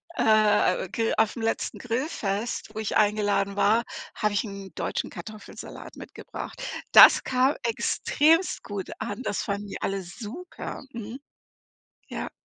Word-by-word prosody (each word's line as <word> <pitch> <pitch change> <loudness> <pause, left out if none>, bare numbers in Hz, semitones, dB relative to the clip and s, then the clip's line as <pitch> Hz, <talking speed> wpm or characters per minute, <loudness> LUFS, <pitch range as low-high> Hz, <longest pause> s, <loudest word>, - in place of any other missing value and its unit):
äh, 215 -4 +3
Gr 225 -1 0
aufm 220 +1 +1
letzten 225 0 -1
Grillfest, 230 -4 -2
wo - - -3
ich 220 - -2
eingeladen 205 -1 +2
war, 215 +3 +3 0.3
habe 210 -1 0
ich 205 - +1
'n 200 -3 -8
deutschen - - -2
Kartoffelsalat 215 -2 -9
mitgebracht. - - -8 0.3
Das - - +9
kam 260 +2 +2
extrem 305 +8 +2
gut 200 -3 -5
an. 235 +3 -4
Das 205 - -1
fanden 200 0 -3
die - - -7
alle 195 -1 -2
super. 240 - -8
Mhm. 230 +1 -7 0.9
Ja. - - -5
215 Hz, 130 wpm, -26 LUFS, 205-235 Hz, 0.9 s, Das